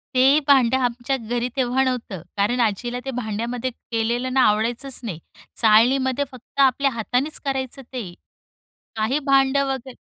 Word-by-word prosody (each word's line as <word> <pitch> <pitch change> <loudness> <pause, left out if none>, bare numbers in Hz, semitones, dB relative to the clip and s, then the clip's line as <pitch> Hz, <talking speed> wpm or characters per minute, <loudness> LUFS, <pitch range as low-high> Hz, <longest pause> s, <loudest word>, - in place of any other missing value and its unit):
ते 270 +4 +5
भांडं 260 -3 +5
आमच्या 245 +2 -1
घरी 240 +1 -2
तेव्हा 260 0 +1
नव्हतं, 235 -9 -3 0.2
कारण 225 +5 +1
आजीला 240 +3 -1
ते 270 - -3
भांड्यामध्ये 235 +1 -3
केलेलं 240 +2 -2
ना 265 - +4
आवडायचंच 235 +5 -1
नाही! 180 -8 -5 0.4
चाळणीमध्ये 255 +5 +3
फक्त 255 +2 -13
आपल्या 275 +1 +3
हातानेच 250 +6 -2
करायचं 270 0 -3
ते. 235 -8 -7 0.8
काही 225 +7 0
भांडं 275 0 +3
वगैरे 260 -1 -8
250 Hz, 135 wpm, -22 LUFS, 230-265 Hz, 0.8 s, ते